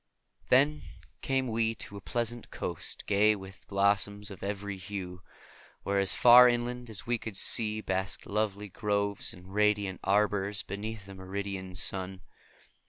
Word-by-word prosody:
Then 145 +4 +4 0.4
came 135 -1 0
we 115 0 0
to 100 - -6
a 100 - -8
pleasant 120 +1 -3
coast - - -4
gay 105 +1 +4
with 95 -1 -12
blossoms 100 +1 +1
of 95 - -10
every 100 0 -4
hue, 95 -2 -6 0.6
where 100 0 +1
as 95 -1 +3
far 125 +1 +8
inland 120 0 -2
as 105 -3 -6
we 120 -1 0
could 110 -4 -6
see 110 -1 +2
basked 95 -1 -3
lovely 105 -1 -2
groves 100 0 0
and 90 +2 -12
radiant 105 -2 +1
arbors 100 0 +1
beneath 100 +1 -6
a 100 - -9
meridian 95 0 -5
sun. 95 0 -1
100 Hz, 145 wpm, -30 LUFS, 95-110 Hz, 0.6 s, far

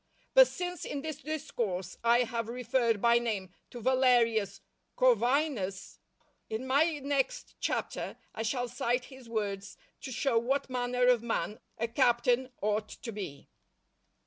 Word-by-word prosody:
But - - +9
since 355 -2 -4
in 285 -1 -4
this 310 -3 -4
Discourse 215 - -3
I 235 +1 +5
have 230 -1 -3
referred 235 -3 0
by 235 0 +6
name 210 -6 -3 0.2
to 240 - -8
Valerius 240 -4 +3 0.4
Corvinus, 260 - +1 0.5
in 220 +4 -3
my 295 +5 +3
next 280 -1 -1
Chapter - - -2 0.2
I - - -4
shall 245 +2 -1
cite 245 +1 -1
his 260 -3 -13
words 205 -3 -3 0.2
to 265 - -6
show 240 0 +2
what 265 +3 -1
manner 250 0 +1
of 250 -2 +5
man 225 -2 -2 0.2
a 230 - -1
captain 245 +1 +2
ought 210 0 0
to 230 - -7
be. 190 -10 -7
240 Hz, 140 wpm, -31 LUFS, 220-265 Hz, 0.5 s, But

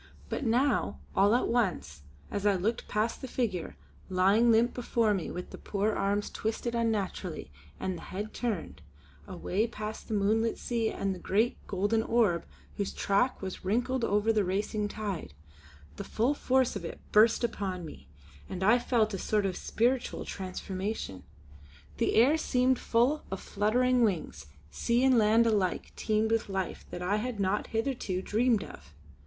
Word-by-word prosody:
But - - -2
now, 245 - +1 0.2
all 205 +3 +5
at 250 - +1
once, 180 - -1 0.3
as 205 0 0
I 200 - +4
looked 210 +6 -1
past 215 +2 -1
the 260 - -5
figure, 220 -9 -2 0.3
lying 195 +6 +4
limp 230 +2 +3
before 235 -3 +1
me 190 -5 -2
with 180 - -6
the - - -9
poor 205 +1 0
arms 200 +1 0
twisted 225 +2 -3
unnaturally 205 - -2 0.3
and 185 - -2
the - - -9
head 210 +3 -5
turned 235 -4 -3 0.5
away 195 +3 -1
past 215 -1 -6
the 220 - -2
moonlit 220 +3 +1
sea 230 -2 -1
and 195 -1 -2
the 185 - -8
great, 215 +7 +1
golden 205 +3 +1
orb 225 -7 +1 0.3
whose 200 - -2
track 200 +4 +1
was 190 -1 -5
wrinkled 245 +6 0
over 210 +1 +2
the 210 -2 +2
racing 205 +3 -1
tide, 200 - -5 0.6
the - - -4
full 240 +6 +1
force 260 -4 +1
of 200 - -4
it 165 - -6
burst 220 +3 +5
upon 190 -6 -2
me, 155 - -11 0.4
and 185 - -4
I 225 +5 +5
felt 230 -3 +1
a 195 - -3
sort 210 +1 +1
of 190 -2 -1
spiritual 245 +6 0
transformation. 185 - -4 0.8
The - - +1
air 260 +8 +5
seemed 255 -4 +2
full 250 +6 +2
of 195 - -4
fluttering 245 +5 +2
wings; 170 - -1 0.2
sea 235 - +1
and 260 -3 +5
land 220 +2 +5
alike 205 -5 0
teemed 220 0 0
with 225 -2 +1
life 190 -1 -3
that 175 - -6
I 200 +4 +1
had 230 0 -3
not 195 +1 0
hitherto 225 -6 -2
dreamed 225 +1 +2
of. 70 +2 -13
215 Hz, 165 wpm, -30 LUFS, 195-235 Hz, 0.8 s, all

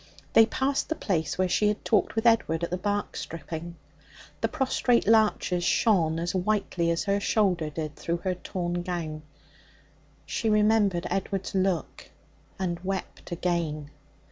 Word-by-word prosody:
They 225 0 +7
passed 270 +3 -1
the 320 - 0
place 165 - -1
where 185 0 +2
she 210 +3 +2
had 210 0 -1
talked 210 -3 +2
with 225 +1 -1
Edward 200 -8 +3
at 170 - -2
the 180 - 0
bark 205 +2 -2
stripping. 165 +1 -6 0.7
The - - +2
prostrate 260 -4 +1
larches 210 -5 +3
shone 170 -7 +3
as 170 +1 -2
whitely 185 -3 0
as 165 0 0
her 200 0 +1
shoulder 185 -7 +1
did 155 -1 -5
through 170 +1 -2
her 185 - +1
torn 175 -1 -3
gown. 170 -4 -4 1.0
She 225 - -1
remembered 210 -4 +3
Edward's 195 0 -2
look, 190 -4 -1 0.5
and 175 -3 -2
wept 190 0 -5
again. 165 -4 -2
185 Hz, 145 wpm, -27 LUFS, 170-210 Hz, 1.0 s, They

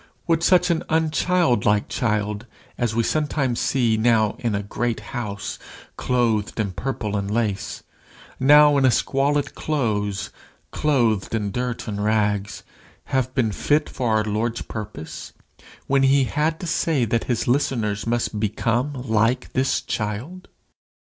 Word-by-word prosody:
Would 165 -2 +2
such 180 0 +4
an 165 - +1
unchildlike 155 - +2
child 105 -1 -1 0.3
as 120 -3 -1
we 115 - +2
see - - 0
sometimes, 145 -5 0
now 110 -3 +2
in 115 -4 -1
a 100 - -2
great 115 +3 -2
house, 105 -5 -4 0.4
clothed 115 -4 0
in 105 -3 0
purple 110 0 -3
and 100 -1 -2
lace, 105 -2 -2 0.6
now 145 +1 +6
in 135 - +3
a - - +6
squalid 140 +3 +1
close, 105 -9 -2 0.4
clothed 115 -9 +1
in 105 -3 -2
dirt 125 +2 -3
and 105 -1 -3
rags, 105 -2 0 0.5
have 130 -1 0
been 120 -5 +1
fit 150 +9 +1
for 125 -2 -2
our 110 - +1
Lord's 110 +3 -2
purpose, 80 -8 -7 0.5
when 135 0 +2
he 135 0 +4
had 155 +5 -1
to - - -4
say 160 -5 +1
that 115 +1 -1
his 120 -3 -1
listeners 115 -6 0
must 120 -2 -1
become 115 +6 0
like 115 +1 +1
this 130 +1 +1
child? 120 - -4
120 Hz, 140 wpm, -23 LUFS, 105-135 Hz, 0.6 s, now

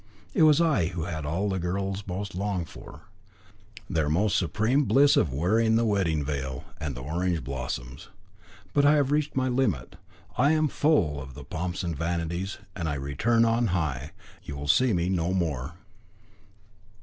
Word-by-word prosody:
It - - +1
was 155 -1 +6
I 150 - +3
who 85 -2 -4
had 80 -3 -4
what 75 - -3
all 95 +5 0
girls 95 +3 -3
most 95 +2 -4
long 95 -1 -2
for, - - -12 0.9
their 75 -2 0
most 95 +6 +2
supreme 110 - +1
bliss 140 +2 +5
of 75 - +2
wearing 110 - +2
the 115 +1 +3
wedding 85 -9 +1
veil 65 -3 -3 0.2
and 75 -4 -4
the 60 - -7
orange 85 +3 -1
blossoms. 65 -1 -5 0.7
But 145 - +3
I 145 +1 +6
have 145 -2 +2
reached 150 0 0
my 130 -1 +1
limit. 125 - -1 0.4
I 140 +5 +5
am 155 -1 +2
full 90 - +2
of 65 -1 -10
the - - -9
pomps 85 +2 -4
and 85 -2 -2
vanities, 85 +4 -2 0.2
and 85 -4 -2
I 75 - -1
return 75 - +1
on 115 +1 +2
high. 70 -4 -2 0.3
You 70 - -7
will 70 +1 -6
see 125 - +4
me 85 -3 +1
no 90 0 0
more." 80 -4 -2
90 Hz, 175 wpm, -27 LUFS, 75-115 Hz, 0.9 s, was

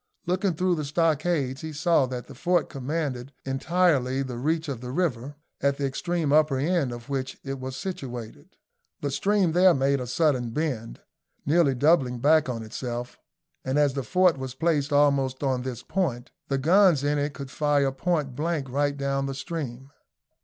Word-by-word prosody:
Looking 185 0 0
through 180 +2 +1
the 155 -3 -2
stockades, 150 -3 0
he 160 -1 -5
saw 155 -2 +2
that 125 -1 -5
the - - -12
fort 175 -1 +1
commanded 140 -1 -3
entirely 135 -2 +1
the 125 -3 -6
reach 160 +4 0
of 130 -5 -4
the 125 - -6
river, 140 -3 -2 0.3
at 140 0 +1
the 140 - -1
extreme 155 +2 -1
upper 150 -3 +4
end 150 -1 +1
of 120 -1 -8
which 135 -2 -3
it 135 -1 -5
was 130 0 -5
situated. 125 - -7 0.4
The 145 - -2
stream 195 +4 +2
there 180 +1 +5
made 140 +1 +2
a 125 - -5
sudden 130 -3 +1
bend, 120 -4 -3 0.4
nearly 145 -2 +3
doubling 135 -2 +3
back 150 +3 +3
on 115 -2 -3
itself; 120 +2 -5 0.4
and 130 +2 -1
as 145 -2 +3
the 140 - -2
fort 180 +1 +2
was 130 -1 -5
placed 150 -1 0
almost 140 -2 +2
on 130 -2 +1
this 125 -3 -5
point, 135 -9 -2 0.2
the 135 - 0
guns 170 +1 +4
in 145 0 +1
it 145 0 -2
could 140 -1 -7
fire 145 -2 +2
point 145 -2 -1
blank 150 -3 -2
right 145 +1 0
down 140 0 -1
the 135 - -4
stream. 135 -4 -6
140 Hz, 175 wpm, -26 LUFS, 130-160 Hz, 0.4 s, there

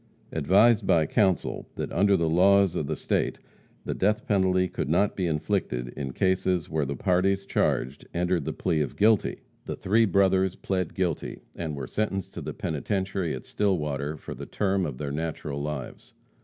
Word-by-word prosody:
Advised 100 +7 +4
by 80 -2 +4
counsel 95 -1 +1
that - - -4
under 100 -1 +3
the 85 -2 +1
laws 95 +2 +4
of 75 - -1
the - - -1
state - - -1 0.5
the - - -1
death 105 +2 0
penalty 95 -2 +2
could 70 - -4
not 95 +5 +2
be 90 -2 -1
inflicted 60 -5 -1
in 65 +2 -5
cases 95 +1 +1
when 75 -3 -1
the 70 - -3
parties 95 +2 +1
charged 70 -7 -1
entered 90 -1 0
the - - -1
plea 80 -2 0
of 70 - -3
guilty, 110 0 +2 0.2
the - - -4
three 110 +4 +3
brothers 95 -1 +3
plead 95 -3 -2
guilty, 90 -4 -2
and 80 -3 -4
were 70 -2 -5
sentenced 95 +2 -2
to - - -6
the - - -4
penitentiary 95 +2 -2
at 65 - -9
Stillwater 75 -7 -1
for - - -8
the - - -8
terms 95 -3 0
of 65 -4 -6
their 70 0 -4
natural 75 -2 -3
lives. 75 -3 -6
90 Hz, 175 wpm, -27 LUFS, 75-95 Hz, 0.5 s, Advised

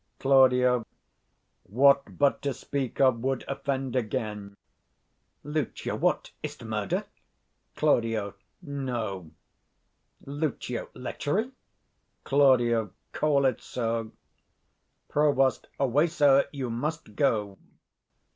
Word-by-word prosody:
Claud. 125 -2 +4 0.8
What 140 +6 +3
but 140 -1 +2
to 140 -3 -2
speak 135 -4 -4
of 130 -3 +4
would 130 +1 -2
offend 135 -2 -3
again. 105 -4 -3 0.9
Lucio. 150 -2 -3
What, - - 0
is't - - -7
murder? - - -2 0.7
130 125 -7 +3
Claud. 100 -2 -3 0.3
No. 120 - -4 1.0
Lucio. 140 -4 -3
Lechery? 145 - -2 0.7
Claud. 120 -6 +3 0.2
Call 145 -3 +2
it 130 -4 +1
so. 115 -2 -3 1.0
Prov. 140 -3 +2
Away, 140 +4 +3
sir! 145 -4 +4
you 130 -4 -4
must 150 +7 -4
go. 105 -8 0
130 Hz, 90 wpm, -27 LUFS, 115-140 Hz, 1.0 s, Claud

